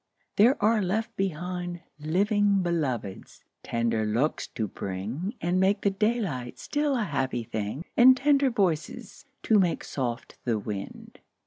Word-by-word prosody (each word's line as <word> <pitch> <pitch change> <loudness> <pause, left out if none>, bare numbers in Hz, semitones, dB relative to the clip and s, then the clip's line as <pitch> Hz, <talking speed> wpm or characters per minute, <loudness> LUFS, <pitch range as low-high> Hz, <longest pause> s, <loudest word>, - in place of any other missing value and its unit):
there 235 +7 +5
are 220 0 +4
left 205 +4 -1
behind 175 -1 -3 0.2
Living 200 +5 +2
Beloveds, 130 - -3 0.2
tender 115 -1 0
looks 115 +8 0
to 110 -3 -3
bring, 110 - -4
And 175 +2 +1
make 195 +2 +2
the 200 - +2
daylight 195 - -1
still 295 -1 -1
a 235 - +1
happy 130 - -1
thing, 110 - -4
And 255 +1 +7
tender 280 0 +3
voices, 185 -9 -2 0.2
to 215 -2 +4
make 180 -3 +1
soft 125 -2 -4
the 115 -3 0
wind. 105 -1 -7
175 Hz, 135 wpm, -27 LUFS, -, 0.2 s, And